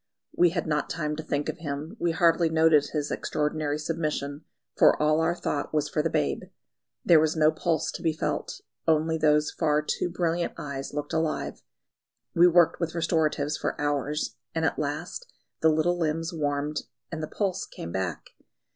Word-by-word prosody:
We 175 - +5
had 170 0 -2
not 150 -2 -1
time 150 -2 -2
to - - -3
think 145 -2 -2
of 170 - -4
him, 150 0 -5
we 175 - +1
hardly 165 0 +3
noted 160 -2 +4
his 150 -2 -3
extraordinary 150 -1 -1
submission, 150 -2 -3 0.3
for - - +5
all 155 +1 +3
our 170 +1 +1
thought 150 -3 -3
was 150 -1 +1
for 155 - 0
the 165 - 0
babe. 70 - 0 0.6
There 165 -2 +7
was 155 +1 +2
no 155 -1 +4
pulse 160 0 -1
to - - -7
be 165 - +2
felt, 155 - -3 0.3
only 160 0 +2
those 150 -1 +3
far 150 -2 +1
too 175 - -1
brilliant 170 0 -1
eyes 140 -2 -5
looked 145 0 -4
alive. 160 -1 -1 0.7
We 175 +1 +6
worked 175 -1 +4
with 170 -1 -2
restoratives 155 -3 +1
for - - -2
hours, 145 +1 -1 0.2
and 160 0 +1
at - - 0
last 155 - -4 0.3
the 160 - +4
little 165 +3 +2
limbs 165 +1 -1
warmed 145 -1 -1 0.3
and 160 -1 -4
the 155 - -3
pulse 190 0 -2
came 85 - -8
back. 95 -3 -3
155 Hz, 175 wpm, -27 LUFS, 150-165 Hz, 0.7 s, There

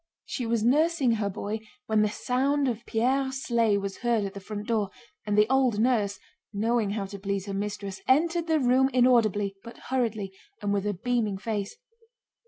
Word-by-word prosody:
She 245 - -3
was 230 -1 +1
nursing 295 +1 +3
her 215 -3 0
boy 205 +3 -4 0.3
when 220 -2 +2
the 210 - +3
sound 270 +5 0
of 235 -2 -2
Pierre's 265 +3 0
sleigh 230 -4 +2
was 200 -1 -4
heard 235 -3 +1
at 195 - -5
the 200 - -7
front 205 +1 -6
door, 215 -4 0 0.4
and 205 0 +1
the 210 0 +5
old 260 -3 +2
nurse—knowing 220 -1 -1
how 200 -1 -2
to 200 +1 -8
please 200 -1 -2
her 200 - -5
mistress—entered 210 - 0
the 320 -1 +3
room 260 0 +3
inaudibly 215 -6 +3
but 235 - -10
hurriedly 220 -7 -1 0.3
and 205 -2 -1
with 200 0 0
a 205 - -1
beaming 225 -1 -1
face. 205 -1 -3
220 Hz, 175 wpm, -27 LUFS, 205-250 Hz, 0.4 s, the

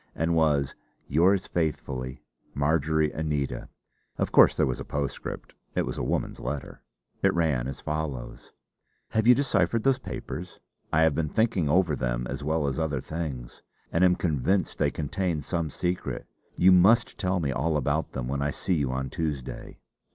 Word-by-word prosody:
And 80 +1 +1
was 75 -4 +2 0.3
"yours 90 +6 +3
faithfully, 65 -6 -3 0.3
'Marjory 80 +1 +2
Anita.'" 75 -5 -2 0.5
Of - - -1
course - - +6
there - - +4
was 65 0 -2
a - - -4
postscript 70 -1 -4 0.2
it - - +1
was - - -4
a - - -2
woman's - - -2
letter! 75 -2 -5 0.4
It - - +4
ran 75 -8 +1
as 70 - -6
follows: 75 -5 -4 0.6
"Have 110 +1 +1
you 125 - +9
deciphered 115 -5 +1
those 135 -1 +3
papers? 90 -7 -7 0.3
I 80 +1 +4
have 80 -2 +4
been 75 +1 -1
thinking 110 -8 +1
over 85 -1 +3
them - - -1
as 65 +3 -5
well 80 0 0
as 70 +2 -1
other 75 -4 0
things, 70 -5 -5 0.3
and 85 - +2
I - - +8
am 90 - +3
convinced 90 +4 0
they - - +3
contain 80 0 -2
some 85 0 -2
secret. 90 +5 -3 0.3
You 95 +1 +6
must 100 +6 +5
tell 90 -2 +1
me 70 -5 -1
all 75 +4 0
about 70 - -1
them 65 -2 -3
when 70 +2 -2
I 70 - +1
see 90 - -1
you 70 -6 +1
on 65 0 -3
Tuesday. 75 -6 -4
80 Hz, 175 wpm, -27 LUFS, 70-90 Hz, 0.6 s, you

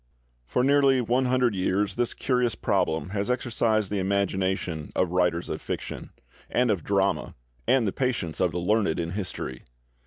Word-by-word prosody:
xxx]2759]) - - -31
For 125 - +2
nearly 140 -1 +4
one 125 +2 +1
hundred 125 -2 +2
years 95 +1 0
this 120 +2 -1
curious 125 -3 +1
problem 80 -3 0
has 100 +2 -1
exercised 115 -4 +1
the 105 - 0
imagination 95 -4 -1
of 90 -2 +1
writers 90 -1 +1
of - - -4
fiction—and 115 - -3
of 95 -7 -1
drama, - - 0 0.3
and 130 -4 +4
the - - +1
patience 120 -12 -1
of 90 -2 +2
the 90 - -4
learned 95 -1 +1
in 85 0 -2
history. 90 - -5
100 Hz, 160 wpm, -26 LUFS, 90-125 Hz, 0.3 s, nearly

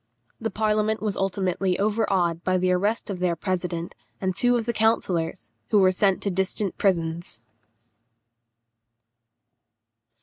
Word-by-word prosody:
The 225 - -2
parliament 215 0 +1
was 210 -2 -2
ultimately 190 -1 0
overawed 195 -5 +1
by 185 0 +2
the 185 0 +1
arrest 205 +4 0
of 185 - -5
their 180 -2 +1
president 175 -1 -3 0.3
and 185 -1 -1
two 245 +3 +3
of 230 - -2
the 235 - -1
councillors, 190 -6 0 0.2
who 215 - +4
were 190 -2 +5
sent 195 0 +1
to 200 - 0
distant 190 +1 -1
prisons. 170 - -1
190 Hz, 130 wpm, -25 LUFS, 180-210 Hz, 0.3 s, were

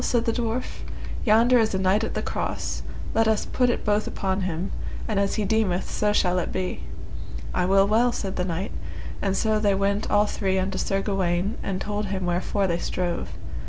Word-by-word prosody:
said 240 -1 +1
the 230 - +2
dwarf; 235 +1 -2 0.5
yonder 235 +3 +6
is 220 -3 +2
a - - +2
knight 190 +3 +3
at - - -2
the - - -1
cross, - - -2 0.3
let 225 0 +3
us 220 -1 +2
put 250 -1 +2
it 240 - -1
both 210 0 +2
upon 190 0 -1
him, 180 0 -2 0.4
and 210 -3 +1
as 200 0 +1
he 215 - 0
deemeth 195 -3 +1
so 210 0 +2
shall 180 -3 +2
it - - -2
be. 185 -1 -2 0.7
I 180 - +2
will 195 +1 +5
well, 230 +4 +4
said 195 -5 -3
the 180 - 0
knight, 180 +2 -2 0.5
and 195 -1 +1
so 215 -1 +2
they 205 -2 +3
went 200 +1 0
all 205 0 +4
three 190 -2 0
unto 190 0 -1
Sir 195 0 0
Gawaine 190 0 0
and 185 -1 -2
told 210 0 -2
him 190 -1 -2
wherefore 180 +3 0
they 170 -2 0
strove. 175 -1 -2
200 Hz, 200 wpm, -25 LUFS, 185-215 Hz, 0.7 s, yonder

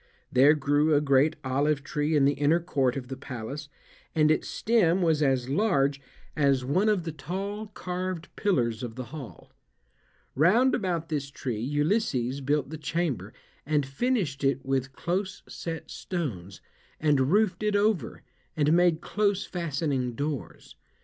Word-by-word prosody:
There 140 +4 +6
grew 145 +2 +2
a - - +5
great 145 +2 +3
olive 140 +2 +1
tree 150 +1 -1
in 140 -2 +4
the 140 - +4
inner 145 +4 +2
court 135 -7 0
of 125 -2 -6
the 135 - -5
palace, 135 +3 -7 0.5
and 155 -1 +4
its 155 - 0
stem 190 -6 +2
was 160 -3 +2
as 130 -3 +2
large 140 -4 +1 0.3
as 140 -4 +2
one 185 +11 +2
of 205 -5 +1
the 165 - -4
tall 195 +8 -5
carved 180 -3 -4
pillars 120 - 0
of 120 -3 -5
the 130 - -5
hall. 140 -7 -9 0.8
Round 215 - +4
about 175 -4 -1
this 145 -3 -2
tree 125 -5 -4
Ulysses 140 - 0
built 145 +1 0
the 160 - -6
chamber, 155 -2 -2 0.3
and 145 -1 +1
finished 145 - -1
it 135 -1 +1
with 135 0 -1
close 185 +6 -3
set 165 -1 -6
stones, 100 - -5 0.4
and 145 -4 +2
roofed 205 -2 +2
it 210 -1 +1
over, 205 - 0 0.3
and 150 +1 +3
made 175 -2 +3
close 200 +1 0
fastening 140 -7 -2
doors. 145 0 -5
150 Hz, 150 wpm, -27 LUFS, 135-175 Hz, 0.8 s, There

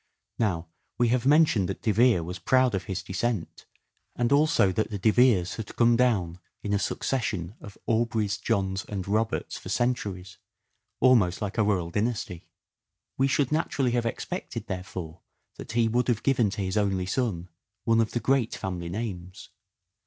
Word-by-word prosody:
Now, 90 -7 0 0.3
we 120 -1 +3
have 125 +1 +1
mentioned 145 - +4
that 95 - -5
De 110 - +2
Vere 115 -4 +4
was 90 +2 -6
proud 130 +1 +3
of 95 -1 -2
his 95 -3 -4
descent, 100 0 -3 0.5
and 120 +1 0
also 145 -9 +4
that 110 +4 -1
the 105 - -4
De 110 +3 +3
Veres 110 -7 +3
had 110 -3 -7
come 120 0 +4
down 100 -9 +1 0.2
in 105 - -2
a 100 - +2
succession 100 -8 -2
of 100 - -11
Aubreys, 110 -3 0
Johns, 95 -4 0
and 95 -3 -5
Roberts 110 +2 -1
for - - -9
centuries 100 -7 -2 0.6
almost 105 -9 +4
like 105 +1 -3
a - - +5
royal 90 -5 0
dynasty. 105 -4 -3 0.7
We 135 - +4
should 135 0 +1
naturally 145 -5 0
have 120 -1 0
expected, - - -5
there 90 -1 -4
fore, 85 -3 -8 0.4
that - - -8
he 115 -1 +3
would 120 +3 +1
have 120 -3 0
given 125 -6 +2
to 100 0 -3
his 95 +2 -2
only 95 -3 +1
son 95 -5 -2 0.3
one 115 -1 +3
of 110 - -2
the 120 - 0
great 130 -2 +1
family 90 -3 -4
names. 95 -2 -6
105 Hz, 175 wpm, -27 LUFS, 95-120 Hz, 0.7 s, a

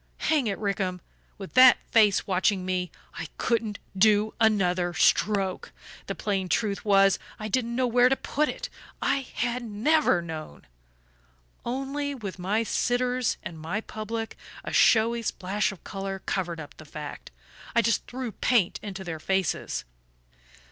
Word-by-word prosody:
"Hang 290 -7 +3
it, 200 - -1
Rickham, 195 -3 -2 0.4
with 195 -2 -9
that 255 -1 +8
face 210 -4 +4
watching 190 -1 +1
me 180 -1 -1 0.3
I 160 - -4
couldn't 225 -3 0 0.2
do 210 +2 +4
another 180 -5 +2
stroke. 195 0 +2 0.4
The - - -3
plain 195 -3 -2
truth 200 +2 0
was, 195 -2 +4 0.2
I 215 - -5
didn't 235 +1 -1
know 255 +1 +2
where 245 +1 +4
to 270 - +3
put 300 +3 -1
it - - -4 0.3
I - - +1 0.2
HAD 240 +2 -1
NEVER 230 - +2
KNOWN. 160 -2 -8 1.0
Only, 275 +3 -3
with 200 -7 -7
my 205 +5 0
sitters 250 +1 0
and 165 -2 -7
my 165 +7 -2
public, 225 +1 -5 0.3
a - - -6
showy 230 0 +4
splash 205 0 -1
of 195 - -13
colour 195 -1 -4
covered 175 -3 -2
up 145 -2 -10
the 155 - -12
fact 150 0 -8 0.5
I 235 - +5
just 225 0 +1
threw 250 -2 -5
paint 220 -4 +1
into 195 -2 -6
their 165 -3 -5
faces.... 190 0 -1
210 Hz, 150 wpm, -27 LUFS, 185-235 Hz, 1.0 s, that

